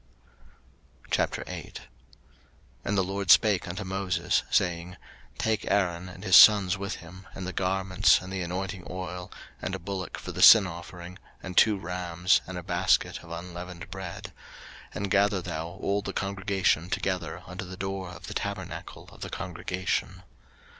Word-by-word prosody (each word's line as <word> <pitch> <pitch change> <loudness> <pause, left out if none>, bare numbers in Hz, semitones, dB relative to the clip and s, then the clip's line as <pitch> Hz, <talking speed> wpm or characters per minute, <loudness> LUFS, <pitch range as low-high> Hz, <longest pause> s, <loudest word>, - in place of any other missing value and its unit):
03:008:001 - - -2 1.0
And 105 - -1
the 95 - +3
LORD 95 0 -4
spake 105 -1 +5
unto 90 +4 -4
Moses, 95 -1 0
saying, 90 0 0 0.4
03:008:002 - - -27
Take 110 -1 0
Aaron 90 -2 0
and 95 +1 -11
his 95 -3 +4
sons 100 -3 +8
with 100 0 -4
him, 90 +3 -12
and 95 - -5
the 95 - -4
garments, 95 +1 +3
and 90 +1 -8
the 95 - -2
anointing 90 +1 -4
oil, 90 0 -6 0.3
and 95 - -3
a - - -3
bullock 95 0 -5
for - - -7
the - - -4
sin 110 -3 +10
offering, 85 +1 -9 0.2
and 90 -1 -6
two 105 +1 +5
rams, 90 -1 +1
and 95 -1 -6
a 90 - -6
basket 90 0 +1
of 85 - -13
unleavened 85 +1 -8
bread; 95 +2 -7 0.6
03:008:003 - - -17
And 100 -1 -3
gather 100 -1 +3
thou 80 0 -4
all 100 +3 -2
the - - -5
congregation 95 -3 0
together 90 -3 -2
unto 90 0 -6
the 90 0 -9
door 95 -1 -4
of 90 - -10
the - - -6
tabernacle - - -5
of - - -16
the - - -5
congregation. 90 0 -3
95 Hz, 160 wpm, -28 LUFS, 90-95 Hz, 1.0 s, sin